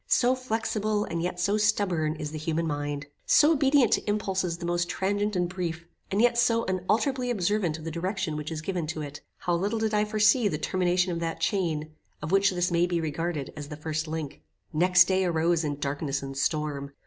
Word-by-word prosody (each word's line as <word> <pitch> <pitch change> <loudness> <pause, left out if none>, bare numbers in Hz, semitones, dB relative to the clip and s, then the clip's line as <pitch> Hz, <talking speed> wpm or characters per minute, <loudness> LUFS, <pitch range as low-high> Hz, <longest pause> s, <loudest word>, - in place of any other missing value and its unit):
So 250 0 +4
flexible, 220 -4 -1
and 165 0 -3
yet 180 +1 -3
so 200 +4 +2
stubborn, 185 -7 +1
is 150 -1 -5
the 155 - -5
human 160 +1 -1
mind. 145 -1 -3 0.2
So 300 +1 +6
obedient 275 -5 +4
to - - 0
impulses 190 -4 -1
the 170 - -6
most 175 0 0
transient 205 +2 -1
and 180 -1 +1
brief, 170 -2 -4 0.2
and 195 - 0
yet 240 +1 +4
so 230 -1 +3
unalterably 215 +8 0
observant 195 -6 0
of 160 - -11
the 165 - -4
direction 185 0 -2
which 150 +1 -5
is 155 -1 -5
given 175 -3 -2
to 155 -1 -4
it! 145 0 -8 0.2
How 175 - -1
little 200 +6 0
did 220 0 -1
I 210 - +3
then 210 - -5
foresee 215 +2 +4
the 155 - -1
termination 180 +2 +1
of 170 - -2
that 165 -1 -3
chain, 160 -7 -1 0.3
of 150 +2 -5
which 195 0 +4
this 180 -1 0
may 170 +1 +3
be 175 -1 0
regarded 160 -2 -3
as 145 -2 -7
the 150 0 -7
first 155 +1 -3
link? 155 -2 -5 0.3
Next 180 +3 +6
day 190 +1 +1
arose 170 -1 +1
in 145 -2 -2
darkness 140 -1 -2
and 135 0 -6
storm. 140 -1 -1
175 Hz, 210 wpm, -27 LUFS, 155-205 Hz, 0.3 s, So